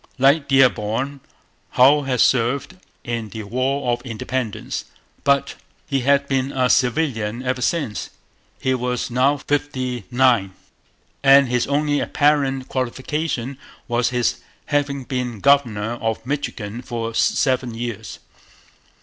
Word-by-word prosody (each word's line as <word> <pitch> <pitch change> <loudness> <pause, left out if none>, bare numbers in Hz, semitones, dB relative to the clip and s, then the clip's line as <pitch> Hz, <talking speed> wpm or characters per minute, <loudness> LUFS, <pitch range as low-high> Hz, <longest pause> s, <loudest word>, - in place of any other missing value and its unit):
Like 140 +2 +4
Dearborn, 135 0 +2 0.6
Hull 140 +3 +6
had 130 -2 +1
served 130 +7 +2 0.3
in 115 -3 -4
the 110 +2 -7
War 130 +4 -1
of 120 - -3
Independence. 120 -1 -4 0.4
But 140 -1 +2 0.3
he 140 -3 0
had 140 +2 +2
been 135 0 0
a 130 -2 +2
civilian 125 -3 0
ever 125 0 -1
since; 125 - -1 0.5
he 130 - 0
was 125 -1 -2
now 135 +4 +3
fifty 130 -6 -2
nine; 120 -7 +3 0.7
and 140 -1 +6
his 125 -1 +1
only 145 +1 +1
apparent 140 -3 +1
qualification 130 +1 -3 0.3
was 120 0 +1
his 125 -1 0 0.3
having 145 -2 -1
been 125 -3 -3
governor 120 -5 +2
of 115 0 -2
Michigan 120 -5 -4
for 115 -2 -4
seven 125 -1 +1
years. 115 -2 -5
130 Hz, 120 wpm, -21 LUFS, 120-140 Hz, 0.7 s, Hull